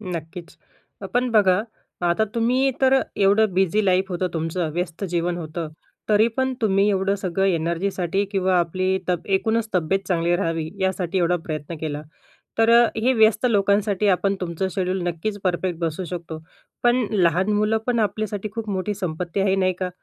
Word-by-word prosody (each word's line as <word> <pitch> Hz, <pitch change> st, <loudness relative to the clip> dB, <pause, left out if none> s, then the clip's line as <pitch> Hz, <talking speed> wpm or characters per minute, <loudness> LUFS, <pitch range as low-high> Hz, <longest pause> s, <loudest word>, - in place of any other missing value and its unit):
नक्कीच. 165 Hz, +2 st, -8 dB, 0.6 s
पण 250 Hz, +1 st, +1 dB
बघा 200 Hz, -3 st, +4 dB, 0.5 s
आता 175 Hz, +6 st, +2 dB
तुम्ही 250 Hz, +4 st, +2 dB
तर 265 Hz, 0 st, +5 dB, 0.2 s
एवढं 205 Hz, +1 st, +3 dB
बिझी 190 Hz, +3 st, +2 dB
लाईफ 185 Hz, 0 st, +3 dB
होतं 180 Hz, 0 st, -1 dB
तुमचं, 165 Hz, +1 st, -2 dB
व्यस्त 175 Hz, +2 st, -3 dB
जीवन 175 Hz, 0 st, -1 dB
होतं. 160 Hz, 0 st, -5 dB, 0.4 s
तरी 215 Hz, +1 st, +5 dB
पण 260 Hz, 0 st, +1 dB
तुम्ही 200 Hz, -1 st, +3 dB
एवढं 195 Hz, 0 st, +1 dB
सगळं 195 Hz, -1 st, -1 dB
एनर्जीसाठी 180 Hz, +2 st, 0 dB
किंवा 190 Hz, -2 st, +2 dB
आपली 185 Hz, +3 st, 0 dB
तब 175 Hz, -2 st, -1 dB
एकूणच 220 Hz, +3 st, 0 dB
तब्येत 180 Hz, +2 st, +1 dB
चांगली 175 Hz, -1 st, +1 dB
राहावी 165 Hz, -3 st, -2 dB
यासाठी 190 Hz, -1 st, -1 dB
एवढा 175 Hz, 0 st, +2 dB
प्रयत्न 155 Hz, +1 st, -5 dB
केला. 150 Hz, -2 st, -3 dB, 0.6 s
तर 225 Hz, 0 st, +4 dB, 0.3 s
हे 235 Hz, +4 st, +2 dB
व्यस्त 220 Hz, 0 st, +4 dB
लोकांसाठी 205 Hz, 0 st, +2 dB
आपण 195 Hz, +1 st, +2 dB
तुमचं 175 Hz, +1 st, -2 dB
शेड्यूल 185 Hz, -1 st, -1 dB
नक्कीच 175 Hz, +5 st, -3 dB
परफेक्ट 180 Hz, -2 st, -1 dB
बसू 165 Hz, +1 st, -2 dB
शकतो. 170 Hz, -2 st, -6 dB, 0.4 s
पण 240 Hz, 0 st, +3 dB
लहान 185 Hz, 0 st, +2 dB
मुलं 215 Hz, +1 st, +2 dB
पण 240 Hz, -2 st, +1 dB
आपल्यासाठी 210 Hz, 0 st, -2 dB
खूप 225 Hz, -2 st, -4 dB
मोठी 195 Hz, +1 st, -2 dB
संपत्ती 180 Hz, -1 st, -3 dB
आहे 195 Hz, 0 st, +2 dB
नाही 185 Hz, -1 st, +1 dB
का. 185 Hz, -1 st, -1 dB
190 Hz, 160 wpm, -23 LUFS, 175-210 Hz, 0.6 s, तर